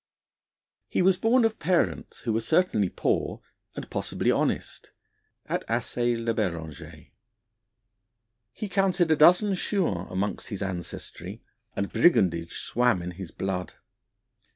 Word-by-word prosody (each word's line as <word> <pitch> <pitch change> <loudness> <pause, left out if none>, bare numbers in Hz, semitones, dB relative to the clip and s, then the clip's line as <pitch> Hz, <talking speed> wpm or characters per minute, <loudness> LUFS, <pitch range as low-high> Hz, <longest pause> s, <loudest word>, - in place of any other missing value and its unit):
He - - +1
was 185 0 +4
born 230 +3 +4
of 225 -1 -1
parents 175 +2 0
who 115 - -1
were 110 - +1
certainly 115 - +2
poor, - - -1 0.4
and - - -6
possibly - - 0
honest, - - -1 0.6
at - - -2
Assé 120 -1 0
le 115 0 -1
Berenger. 85 - -5 1.4
He 210 - -5
counted 190 -4 +2
a - - +6
dozen 180 +7 +6
Chouans 175 - -1
among 95 +3 -1
his 100 -2 -4
ancestry, 90 -3 -6 0.3
and 100 - -3
brigandage 85 - +2
swam 120 -7 +1
in 90 - -4
his 90 0 -8
blood. 95 0 -4
115 Hz, 125 wpm, -27 LUFS, -, 1.4 s, a